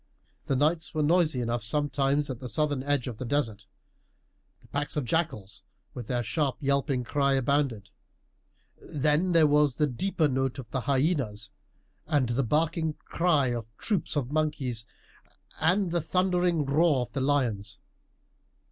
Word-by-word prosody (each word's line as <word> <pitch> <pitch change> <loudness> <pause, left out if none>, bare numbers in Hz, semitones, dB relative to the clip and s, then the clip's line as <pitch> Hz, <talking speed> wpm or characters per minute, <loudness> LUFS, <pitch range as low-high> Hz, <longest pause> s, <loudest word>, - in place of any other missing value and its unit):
"The 135 - +1
nights 155 +4 0
were 155 - +1
noisy 160 -4 +2
enough 120 -1 -2
sometimes 145 +2 +1
at 125 - -6
the 125 - -6
southern 145 -2 0
edge 145 -2 0
of 120 -4 -6
the - - -3
desert. 115 -7 -2 0.9
The - - -21
packs 145 +1 -3
of 145 - -1
jackals, 110 - -2 0.3
with 125 -5 -7
their 120 -2 -1
sharp 135 +4 -1
yelping 140 -2 0
cry, 140 +2 +1
abounded; 135 -6 0 0.9
then 150 +5 0
there 165 -2 +6
was 145 -2 +3
the 150 - +2
deeper 155 +4 0
note 135 -1 -1
of 130 -4 -7
the 130 - -1
hyenas, 130 - 0 0.6
and 140 -5 +1
the 120 +3 +1
barking 160 +4 0
cry 155 -7 +2
of 115 -2 -4
troops 200 -8 -1
of 140 -3 -1
monkeys, 145 -7 -1 0.7
and 180 +3 +2
the 170 0 +1
thundering 180 -2 +1
roar 145 0 +3
of 125 - -5
the 135 - -2
lions. 130 -8 0
145 Hz, 150 wpm, -28 LUFS, 125-155 Hz, 0.9 s, there